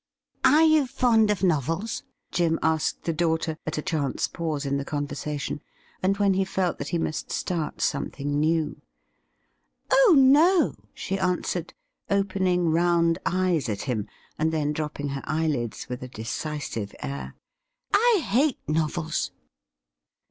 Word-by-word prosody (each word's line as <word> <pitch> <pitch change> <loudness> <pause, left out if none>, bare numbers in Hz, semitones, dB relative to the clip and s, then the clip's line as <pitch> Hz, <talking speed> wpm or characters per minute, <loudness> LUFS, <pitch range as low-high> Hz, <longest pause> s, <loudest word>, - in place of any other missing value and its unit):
' - - -59
Are 300 +5 +6
you 310 -4 +4
fond 230 -3 +3
of 200 -3 0
novels 165 - 0 0.2
?' - - -52
Jim 165 -2 +2
asked 160 -1 0
the 165 - -1
daughter 160 -1 0
at 155 - -2
a 150 - -2
chance 145 -5 -1
pause 155 -4 -3
in 140 0 0
the 140 - -2
conversation, 145 0 -4 0.4
and 195 +2 +1
when 200 -1 +3
he 190 +1 +2
felt 190 -2 -1
that 140 - -4
he 170 - -1
must 160 -1 -3
start 165 -4 -2
something 145 0 -1
new. 160 0 0 0.6
' - - -32
Oh 270 +6 +6
no 305 +7 +5
!' - - -27
she 195 +1 -3
answered, 180 -2 -1 0.3
opening 185 -3 +1
round 170 0 +3
eyes 180 -7 +1
at 100 -1 -3
hira, 115 -7 -2 0.3
and 160 +1 +2
then 150 -2 0
dropping 150 -2 -3
her 135 0 -4
eyelids 150 -7 -1
with 125 0 -5
a 130 - -6
decisive 115 -2 -5
air. 70 -1 -5 0.6
'I 430 -3 +4
hate 260 +7 +2
novels 160 +1 -1
165 Hz, 150 wpm, -26 LUFS, 145-190 Hz, 0.6 s, Are